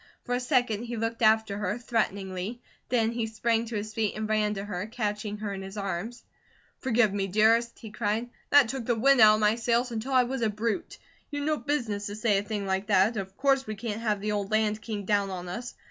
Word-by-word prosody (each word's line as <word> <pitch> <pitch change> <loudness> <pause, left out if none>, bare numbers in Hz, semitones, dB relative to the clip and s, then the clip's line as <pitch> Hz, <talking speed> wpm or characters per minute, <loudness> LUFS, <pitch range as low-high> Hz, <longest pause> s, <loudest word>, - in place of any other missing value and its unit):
For 245 - -3
a 245 - +1
second 245 -4 +1
he 235 0 -5
looked 225 +1 -2
after 220 -2 +3
her 205 +1 -1
threateningly, 200 -3 -2 0.3
then 230 -2 +2
he 230 -1 -2
sprang 225 +1 0
to 230 - -5
his 215 +1 -4
feet, 215 -2 -1
and 215 0 -3
ran 215 -1 +1
to 195 0 -4
her, 205 -1 -4
catching 210 -2 -3
her 210 -1 -4
in 195 - -5
his 195 +2 -8
arms. 200 +4 -4 0.6
"Forgive 235 -5 +2
me, 195 -1 -1
dearest," 225 +4 +3
he 220 - -10
cried. 220 +2 -2 0.2
"That 285 -4 +6
took 250 -1 -4
the 240 - +2
wind 265 +2 +4
out 215 0 +8
of 215 - -2
my 210 0 +4
sails 235 +2 0
until 230 +4 -3
I 255 -1 +6
was 260 +1 -3
a 225 - +2
brute. 225 - -3 0.3
You'd 290 -1 -3
no 305 0 +1
business 230 -9 -2
to 205 - -5
SAY 215 -2 +2
a - - -4
thing 205 -1 -3
like 190 +1 -1
that. 200 +2 +4
Of 190 -2 -5
course 270 -1 +2
we 215 - -4
can't 220 0 -4
have 210 -3 0
the 210 +1 -1
old 205 -1 -2
Land 215 0 +1
King 215 -3 -5
down 200 -1 +1
on 180 -1 -5
us. 235 +7 -6
220 Hz, 235 wpm, -28 LUFS, 205-235 Hz, 0.6 s, out